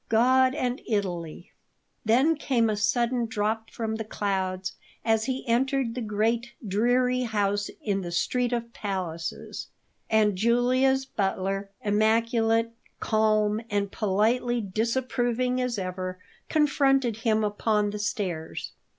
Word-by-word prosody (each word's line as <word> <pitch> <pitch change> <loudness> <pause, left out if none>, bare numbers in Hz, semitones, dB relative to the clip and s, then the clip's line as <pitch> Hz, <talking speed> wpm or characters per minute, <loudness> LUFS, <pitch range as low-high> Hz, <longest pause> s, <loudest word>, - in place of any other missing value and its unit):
God 255 +3 +4
and 250 -4 -1
Italy 175 -6 -3 0.5
Then 260 +9 +4
came 240 -6 +1
a - - 0
sudden 235 +3 +1
drop 220 +1 -1
from 220 -1 -3
the 225 - -3
clouds 190 -3 -2 0.3
as 225 -1 +2
he 260 0 -3
entered 255 +1 +1
the 250 - -4
great, 225 +2 0
dreary 245 +5 +2
house 205 -3 0
in 200 -2 0
the 175 -2 -5
"Street 245 +7 0
of 235 -1 -3
Palaces," 175 -5 -4 0.4
and 215 -2 +3
Julia's 250 +5 +2
butler, 195 -3 -2
immaculate, 225 +2 +2 0.3
calm, 215 -1 +2
and 200 -1 -1
politely 230 +4 +1
disapproving 245 +4 0
as 250 -2 -1
ever, 185 -1 -4 0.3
confronted 270 -6 +2
him 220 -1 +1
upon 210 0 +1
the 210 - -5
stairs. 190 -7 -3
225 Hz, 120 wpm, -27 LUFS, 205-245 Hz, 0.5 s, God